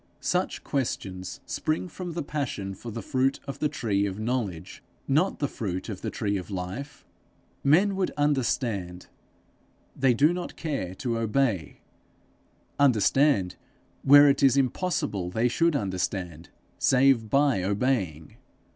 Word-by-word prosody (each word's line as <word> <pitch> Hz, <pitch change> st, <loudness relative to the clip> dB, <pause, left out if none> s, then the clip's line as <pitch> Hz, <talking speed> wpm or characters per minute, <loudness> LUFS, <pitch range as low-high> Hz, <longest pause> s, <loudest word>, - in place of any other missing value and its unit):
Such -, -, -1 dB
questions 95 Hz, -9 st, -3 dB
spring 155 Hz, +3 st, -2 dB
from 175 Hz, 0 st, -7 dB
the 170 Hz, -1 st, -3 dB
passion 125 Hz, -10 st, -3 dB
for 115 Hz, +5 st, -9 dB
the 115 Hz, +1 st, -6 dB
fruit 135 Hz, -2 st, 0 dB
of 140 Hz, -, -6 dB
the 150 Hz, -, +1 dB
tree 100 Hz, -8 st, 0 dB
of 95 Hz, 0 st, -5 dB
knowledge, 110 Hz, -8 st, -3 dB, 0.3 s
not 155 Hz, +8 st, +2 dB
the 145 Hz, -, -1 dB
fruit 95 Hz, -5 st, -4 dB
of 100 Hz, -3 st, -6 dB
the -, -, -3 dB
tree 105 Hz, -5 st, -2 dB
of 90 Hz, -, -7 dB
life. 95 Hz, +10 st, -6 dB, 0.6 s
Men 185 Hz, +8 st, +4 dB
would 190 Hz, -1 st, 0 dB
understand: 120 Hz, -10 st, -1 dB, 0.9 s
they 130 Hz, -2 st, +3 dB
do 150 Hz, +7 st, +4 dB
not 175 Hz, 0 st, -5 dB
care 135 Hz, -, -4 dB
to 115 Hz, +2 st, -2 dB
obey, 115 Hz, -, 0 dB, 1.0 s
understand 135 Hz, -4 st, +3 dB, 0.4 s
where 145 Hz, +1 st, +8 dB
it 140 Hz, 0 st, +3 dB
is 135 Hz, -1 st, +5 dB
impossible 135 Hz, -, -1 dB
they 110 Hz, +6 st, +1 dB
should 165 Hz, +6 st, +2 dB
understand 90 Hz, -, -3 dB, 0.3 s
save 130 Hz, -4 st, +3 dB
by 140 Hz, -6 st, +3 dB
obeying. 95 Hz, -, -1 dB
125 Hz, 135 wpm, -26 LUFS, 95-145 Hz, 1.0 s, where